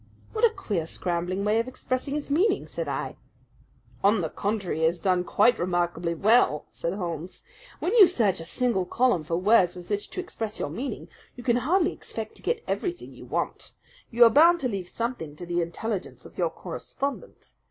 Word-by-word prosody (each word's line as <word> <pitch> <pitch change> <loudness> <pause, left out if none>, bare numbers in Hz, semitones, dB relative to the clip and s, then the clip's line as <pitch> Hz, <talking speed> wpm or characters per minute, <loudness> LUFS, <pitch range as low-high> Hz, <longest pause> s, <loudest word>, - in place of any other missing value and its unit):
"What 440 +1 -3
a 470 - +8
queer, 200 - -3
scrambling 180 +3 -2
way 215 +2 +3
of 230 - -1
expressing 255 +2 -3
his 295 -1 -4
meaning!" 360 +10 +2
said - - -5
I. - - -3 0.9
"On 200 0 +4
the 160 - -3
contrary, 200 -5 -2
he 160 - +3
has 170 +2 +1
done 180 0 +2
quite 235 +6 +3
remarkably 175 -1 0
well," 205 -5 +3
said 170 - -3
Holmes. 175 -2 -5 0.3
"When 365 - -1
you 425 -6 +9
search 220 - +1
a 165 - -7
single 235 0 0
column 240 -3 +2
for 165 +2 -1
words 185 -2 +4
with 180 +2 -10
which 205 0 -2
to - - -6
express 225 - -4
your - - -3
meaning, 270 +2 -5 0.3
you 245 - -9
can 240 -1 +3
hardly 335 +8 +2
expect 220 -1 -6
to - - -11
get 465 -1 -1
everything 355 -1 -3
you - - -12
want. - - -3 0.4
You 240 0 +5
are 230 - +8
bound 335 +6 +6
to 255 - +1
leave 195 -6 -4
something 230 - -4
to 175 - -8
the 175 0 0
intelligence 190 +4 -4
of - - -13
your - - +1
correspondent. 280 0 -6
215 Hz, 195 wpm, -26 LUFS, 175-255 Hz, 0.9 s, you